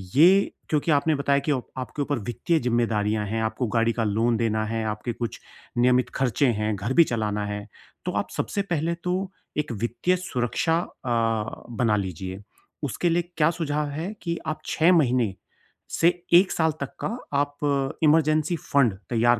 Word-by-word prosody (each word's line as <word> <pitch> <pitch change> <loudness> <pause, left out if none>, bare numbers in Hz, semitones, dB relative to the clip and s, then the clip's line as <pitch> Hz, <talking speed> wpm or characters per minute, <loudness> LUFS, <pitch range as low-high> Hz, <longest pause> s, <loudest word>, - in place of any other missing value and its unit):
ये 185 +7 +6 0.2
क्योंकि 155 +1 +1
आपने 150 +2 +3
बताया 140 0 +2
कि - - +3
आपके 130 +1 -4
ऊपर 145 -2 -1
वित्तीय 120 - 0
जिम्मेदारियाँ 110 -3 +1
हैं, 110 +2 -1
आपको 110 +3 -1
गाड़ी 115 +1 +2
का 115 - -1
लोन 115 +3 +2
देना 110 -1 0
है, 110 +1 -2
आपके 105 +3 -3
कुछ 120 0 -4 0.4
नियमित 125 +1 +3
खर्चे 135 +1 +2
हैं, 105 -2 0
घर 100 +6 -2
भी 170 - +7
चलाना 105 -4 -1
है 105 0 -5 0.4
तो - - -1
आप - - -1
सबसे 200 - -1
पहले 165 +1 0
तो 185 +1 -1 0.3
एक 150 -4 -1
वित्तीय 120 - 0
सुरक्षा 160 0 0
अ, 130 -7 -7 0.6
बना 115 -2 +2
लीजिए 95 0 -4 0.4
उसके 155 +6 0
लिए 170 +1 +2 0.2
क्या 155 0 +4
सुझाव 150 -3 -1
है 160 +8 -4
कि 170 -1 -2
आप 155 - -2
6 165 +3 +3
महीने 125 - +3 0.6
से 170 - +4 0.2
1 185 +2 +7
साल 160 -1 +2
तक 140 - -4
का - - +1 0.3
आप 145 0 -1 0.5
इमरजेंसी 155 +1 +3
फंड 135 -9 +2 0.2
तैयार 120 0 +3
125 Hz, 165 wpm, -25 LUFS, 110-155 Hz, 0.6 s, भी